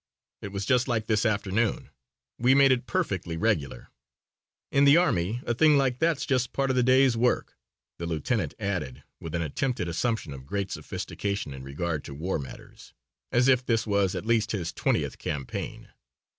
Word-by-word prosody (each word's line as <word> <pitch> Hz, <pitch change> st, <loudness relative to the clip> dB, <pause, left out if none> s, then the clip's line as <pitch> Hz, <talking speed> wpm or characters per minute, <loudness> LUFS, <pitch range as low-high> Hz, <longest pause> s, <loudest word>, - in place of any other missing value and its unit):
It -, -, -5 dB
was 100 Hz, 0 st, -4 dB
just 125 Hz, +1 st, +2 dB
like 110 Hz, -3 st, 0 dB
this 110 Hz, 0 st, +2 dB
afternoon. 105 Hz, +1 st, -1 dB, 0.5 s
We 125 Hz, +2 st, +4 dB
made 140 Hz, -1 st, +6 dB
it 125 Hz, 0 st, 0 dB
perfectly 95 Hz, -, -2 dB
regular." 80 Hz, -, -1 dB, 0.8 s
"In 140 Hz, -, +4 dB
the 140 Hz, +3 st, +7 dB
army 115 Hz, -, +1 dB
a 120 Hz, -, 0 dB
thing 150 Hz, +4 st, +5 dB
like 130 Hz, -2 st, +1 dB
that's 165 Hz, -3 st, +1 dB
just 130 Hz, -2 st, 0 dB
part 135 Hz, -1 st, +1 dB
of -, -, -1 dB
the 125 Hz, -, +3 dB
day's 130 Hz, 0 st, +4 dB
work," 120 Hz, +2 st, 0 dB, 0.4 s
the 85 Hz, -, -3 dB
lieutenant 85 Hz, -, -1 dB
added, 90 Hz, -, -3 dB, 0.2 s
with 80 Hz, 0 st, -6 dB
an 85 Hz, -, 0 dB
attempted 90 Hz, -, -2 dB
assumption 85 Hz, -, -2 dB
of 65 Hz, 0 st, -11 dB
great 100 Hz, +3 st, -3 dB
sophistication 100 Hz, -8 st, -4 dB
in 65 Hz, -, -8 dB
regard 75 Hz, +3 st, -3 dB
to 70 Hz, -, -8 dB
war 85 Hz, +4 st, -2 dB
matters, 65 Hz, -, -11 dB, 0.4 s
as 125 Hz, +2 st, +3 dB
if 130 Hz, -2 st, +4 dB
this 115 Hz, -2 st, 0 dB
was 100 Hz, -3 st, +1 dB
at -, -, -4 dB
least 115 Hz, -1 st, +1 dB
his 90 Hz, -5 st, -3 dB
twentieth -, -, -1 dB
campaign. 70 Hz, -3 st, -5 dB
110 Hz, 175 wpm, -27 LUFS, 85-125 Hz, 0.8 s, the